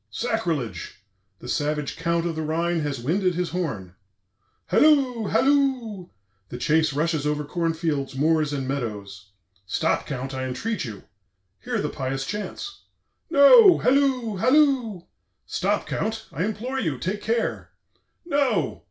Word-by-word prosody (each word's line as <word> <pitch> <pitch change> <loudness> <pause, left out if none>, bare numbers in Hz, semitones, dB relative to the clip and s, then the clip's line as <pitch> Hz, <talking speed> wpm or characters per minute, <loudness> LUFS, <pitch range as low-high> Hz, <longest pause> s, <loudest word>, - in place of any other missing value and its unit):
Sacrilege! 165 - -3 0.3
The 120 - -11
savage 150 +1 -1
Count 170 0 -1
of 170 -2 -2
the 160 - -3
Rhine 165 +2 0
has 145 -4 -3
winded 180 +8 0
his 180 0 -2
horn. 110 - -4 0.7
"Halloo! 265 -8 +3
Halloo! 260 -9 +1 0.4
The 125 - -6
chase 155 +4 +2
rushes 150 0 0
over 150 0 -1
corn 165 +1 -1
fields, 150 -5 -2
moors, 155 +1 +2
and 135 -3 -3
meadows. 105 -7 -5 0.4
'Stop, - - 0
Count, 135 0 -4
I 130 0 -3
entreat 180 - -3
you; 105 -4 -8 0.6
hear - - -2
the 150 - -1
pious 135 0 -3
chants!' 210 - -6 0.5
No! 360 - +8
Halloo! 255 -5 +1
Halloo! 255 - +2 0.4
'Stop, - - -1
Count, 220 0 -3
I 180 - -2
implore 240 +5 -3
you; 160 - -1
take 185 +10 -3
care!' 230 +1 -1 0.6
No! 265 - 0
170 Hz, 135 wpm, -24 LUFS, 140-225 Hz, 0.7 s, No